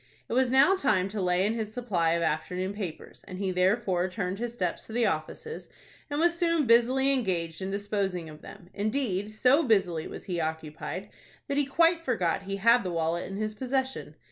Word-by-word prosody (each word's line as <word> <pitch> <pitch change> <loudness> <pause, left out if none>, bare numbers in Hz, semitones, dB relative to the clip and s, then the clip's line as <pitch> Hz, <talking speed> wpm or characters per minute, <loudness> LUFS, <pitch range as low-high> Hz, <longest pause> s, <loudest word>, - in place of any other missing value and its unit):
It - - -4
was 255 0 +3
now 270 +9 +5
time 200 - +1
to 205 0 -3
lay 180 +1 +2
in 215 - +1
his 220 -2 -3
supply 180 -10 +1
of 170 0 0
afternoon 180 +5 -1
papers, 195 -6 -7
and 185 - -7
he 190 -1 -1
therefore 185 0 +1
turned 185 0 -3
his 240 0 -3
steps 185 -7 -3
to 220 - -9
the 240 0 +2
offices, 205 - -4 0.4
and 290 0 -2
was 340 +1 +3
soon 335 -3 +1
busily 255 +4 +4
engaged 175 -9 -1
in 190 - -3
disposing 200 -3 -2
of 155 0 -11
them. 185 -3 -13
Indeed, 210 -2 -1
so 250 +7 +4
busily 190 - +1
was - - -8
he 175 -3 -2
occupied, 160 -1 -5 0.4
that 280 -1 -1
he 290 - +3
quite 330 +3 +3
forgot 190 - 0
he 195 - -1
had 230 +5 +4
the 185 - -3
wallet 170 0 -1
in 195 - -5
his 215 0 -2
possession. 265 +3 -3
205 Hz, 195 wpm, -28 LUFS, 180-250 Hz, 0.4 s, now